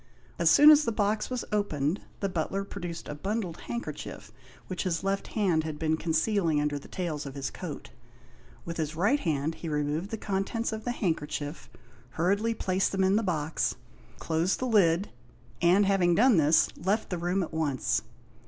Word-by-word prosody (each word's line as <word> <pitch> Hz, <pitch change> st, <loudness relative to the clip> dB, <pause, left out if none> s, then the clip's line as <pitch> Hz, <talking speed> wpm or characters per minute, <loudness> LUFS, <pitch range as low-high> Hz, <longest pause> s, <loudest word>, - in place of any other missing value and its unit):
As -, -, +4 dB
soon 300 Hz, +1 st, +9 dB
as 300 Hz, 0 st, +6 dB
the 230 Hz, -, 0 dB
box 210 Hz, 0 st, 0 dB
was 250 Hz, -2 st, -3 dB
opened, 180 Hz, -5 st, 0 dB, 0.2 s
the 200 Hz, -, +1 dB
butler 190 Hz, +2 st, -2 dB
produced 175 Hz, -4 st, -7 dB
a -, -, -4 dB
bundled 190 Hz, +2 st, -3 dB
handkerchief 235 Hz, 0 st, -6 dB, 0.3 s
which 185 Hz, -, -4 dB
his 175 Hz, -1 st, -1 dB
left 195 Hz, 0 st, -1 dB
hand 180 Hz, -7 st, +2 dB
had 155 Hz, -1 st, -5 dB
been 160 Hz, 0 st, +1 dB
concealing 165 Hz, 0 st, +1 dB
under 145 Hz, -1 st, -1 dB
the -, -, -14 dB
tails 155 Hz, -6 st, -4 dB
of 135 Hz, -, -8 dB
his 135 Hz, -1 st, -3 dB
coat. -, -, -7 dB, 0.7 s
With 170 Hz, 0 st, -5 dB
his 155 Hz, -1 st, -2 dB
right 205 Hz, -, +2 dB
hand 155 Hz, -, -1 dB
he 165 Hz, -, -6 dB
removed 150 Hz, +5 st, -1 dB
the 225 Hz, -, -4 dB
contents 205 Hz, +3 st, -2 dB
of 220 Hz, 0 st, -6 dB
the 245 Hz, -, 0 dB
handkerchief, 155 Hz, -7 st, -3 dB, 0.5 s
hurriedly 200 Hz, +7 st, +1 dB
placed 190 Hz, -2 st, 0 dB
them 190 Hz, -1 st, +1 dB
in 190 Hz, +1 st, +3 dB
the 220 Hz, -, +3 dB
box, 160 Hz, -6 st, -1 dB, 0.4 s
closed 165 Hz, +3 st, 0 dB
the 255 Hz, -, -3 dB
lid, 195 Hz, -5 st, +3 dB, 0.5 s
and 180 Hz, +4 st, +5 dB
having 185 Hz, -3 st, +3 dB
done 235 Hz, +1 st, +5 dB
this, 155 Hz, +1 st, +4 dB
left 200 Hz, +5 st, -1 dB
the 180 Hz, -, -2 dB
room 180 Hz, +3 st, 0 dB
at 165 Hz, -, -7 dB
once. 140 Hz, -, 0 dB
180 Hz, 180 wpm, -28 LUFS, 160-205 Hz, 0.7 s, soon